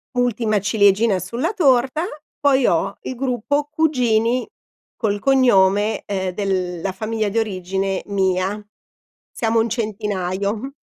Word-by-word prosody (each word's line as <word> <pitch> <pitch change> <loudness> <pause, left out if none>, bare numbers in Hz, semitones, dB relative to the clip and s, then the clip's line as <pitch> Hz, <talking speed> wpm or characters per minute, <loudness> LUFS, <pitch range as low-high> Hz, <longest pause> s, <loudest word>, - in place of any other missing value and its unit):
Ultima 230 -3 +1
ciliegina 205 0 +3
sulla 235 - -3
torta, 270 - +2 0.4
poi 275 -3 +3
ho 165 - +1
il - - -4
gruppo 270 +3 -1
cugini 250 -6 +1 0.5
col 205 -3 -1
cognome, 215 -5 +3
ehm, 190 -2 -2
della 185 -2 -2
famiglia 215 +1 -2
di 210 - -4
origine 195 -2 -1
mia. 190 0 0 0.7
Siamo 225 0 0
un 225 +1 +1
centinaio. 210 +1 -3
215 Hz, 110 wpm, -20 LUFS, 195-245 Hz, 0.7 s, ciliegina